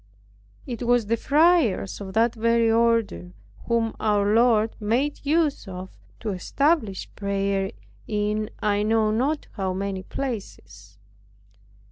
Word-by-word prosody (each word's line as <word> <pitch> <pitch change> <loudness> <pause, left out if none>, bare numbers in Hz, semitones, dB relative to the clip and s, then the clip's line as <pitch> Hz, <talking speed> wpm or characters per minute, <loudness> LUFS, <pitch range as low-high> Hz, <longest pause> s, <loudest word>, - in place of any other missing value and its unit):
It 240 -1 -6
was 245 -2 +3
the 230 +3 +1
friars 285 - +2
of 190 -1 -7
the 230 +1 +4
very 230 0 +2
order 225 - +1 0.3
whom 230 -1 0
our 205 -1 +2
Lord 225 -1 +3
made 240 +7 -1
use 300 -5 +1
of 185 0 -8 0.3
to 225 - -3
establish 220 - 0
prayer 195 -1 -1 0.4
in 210 0 -1
(I 205 -1 +2
know 215 0 +2
not 270 +8 0
how) 190 -2 -2
many 195 0 -3
places. 110 - -7
220 Hz, 120 wpm, -24 LUFS, 200-235 Hz, 0.4 s, the